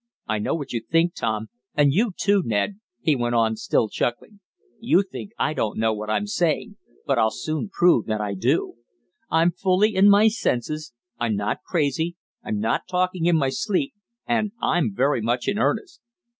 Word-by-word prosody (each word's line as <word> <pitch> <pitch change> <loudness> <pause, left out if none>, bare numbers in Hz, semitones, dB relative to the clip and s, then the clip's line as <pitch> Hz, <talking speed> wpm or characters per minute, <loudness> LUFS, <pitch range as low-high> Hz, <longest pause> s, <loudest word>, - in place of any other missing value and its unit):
"I 110 0 0
know 105 - -1
what 145 -6 -5
you 115 - -1
think, 165 +8 +1
Tom, 110 0 -2 0.3
and 145 -2 +4
you, 215 +6 +2
too, 200 -1 +3
Ned," 115 - -1 0.2
he 155 - +3
went 120 -1 -1
on, 110 -1 +2
still 110 - +1
chuckling. 120 - -3 0.4
"You 220 -4 +3
think 195 +1 -8
I 155 - 0
don't 110 -8 -2
know 110 0 +2
what 105 0 -5
I'm 110 - 0
saying, 175 -7 -1 0.3
but - - +1
I'll 110 - +4
soon 155 - -4
prove 175 - +3
that 110 -1 -1
I 105 -1 -2
do. 115 +4 0 0.5
I'm 165 +2 +3
fully 190 +4 +2
in 195 +2 +6
my 205 +2 +6
senses, 155 - -1 0.3
I'm 115 -3 0
not 105 +1 -2
crazy, 160 +1 -1 0.3
I'm 105 - -2
not 110 - -1
talking 180 -1 0
in 175 - +4
my 135 -3 +1
sleep, 210 - -1 0.3
and 220 -4 0
I'm 160 - +1
very 135 0 +2
much 120 +2 -1
in 205 +1 0
earnest. 360 - -1
155 Hz, 185 wpm, -23 LUFS, 115-190 Hz, 0.5 s, in